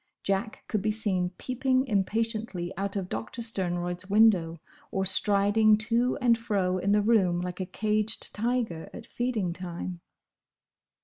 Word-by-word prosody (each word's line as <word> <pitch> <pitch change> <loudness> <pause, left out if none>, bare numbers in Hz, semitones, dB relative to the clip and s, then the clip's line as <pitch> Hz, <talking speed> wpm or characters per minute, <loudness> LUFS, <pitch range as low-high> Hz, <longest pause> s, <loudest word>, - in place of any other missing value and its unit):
Jack 200 +3 -2
could 215 - -1
be 215 - 0
seen 205 -5 0
peeping 260 +1 0
impatiently 215 -4 -1
out 195 +1 -3
of 195 -3 -2
Doctor 235 +4 -5
Sternroyd's 180 -3 -2
window, 190 -6 +4 0.3
or 190 -1 -1
striding 205 +3 +4
to 235 +3 +1
and 240 -2 +4
fro 190 -5 0
in 200 +3 0
the 210 0 +3
room 195 -6 +3
like 180 +1 -5
a 185 - -3
caged 215 +1 0
tiger 225 -7 -2
at - - -9
feeding 225 -8 -2
time. 175 0 -6
205 Hz, 140 wpm, -28 LUFS, 185-225 Hz, 0.3 s, window